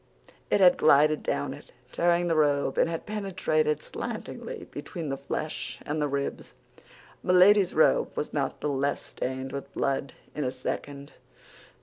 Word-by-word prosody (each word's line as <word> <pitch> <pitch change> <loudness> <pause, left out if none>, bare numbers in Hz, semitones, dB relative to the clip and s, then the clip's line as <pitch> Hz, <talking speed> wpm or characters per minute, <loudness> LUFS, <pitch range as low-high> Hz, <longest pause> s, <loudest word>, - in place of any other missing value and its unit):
It 205 - +3
had 180 -1 +7
glided 155 0 +5
down - - -2
it, - - -14 0.2
tearing 175 0 +2
the 165 - +1
robe, 145 -3 +2
and - - +3
had 165 -1 -4
penetrated 175 -8 0
slantingly - - -6
between 165 -4 -6
the 135 - -1
flesh 145 +3 -4
and 150 +1 -2
the 150 - +1
ribs. 140 0 -4 0.7
Milady's 185 +1 +5
robe 155 - +4
was 150 - -3
not 140 -3 -2
the 150 - -1
less 140 0 -1
stained 130 +1 -5
with 140 -1 -6
blood 135 0 -1 0.2
in 150 - -3
a 130 - 0
second. 140 +2 -5
150 Hz, 150 wpm, -27 LUFS, 140-170 Hz, 0.7 s, had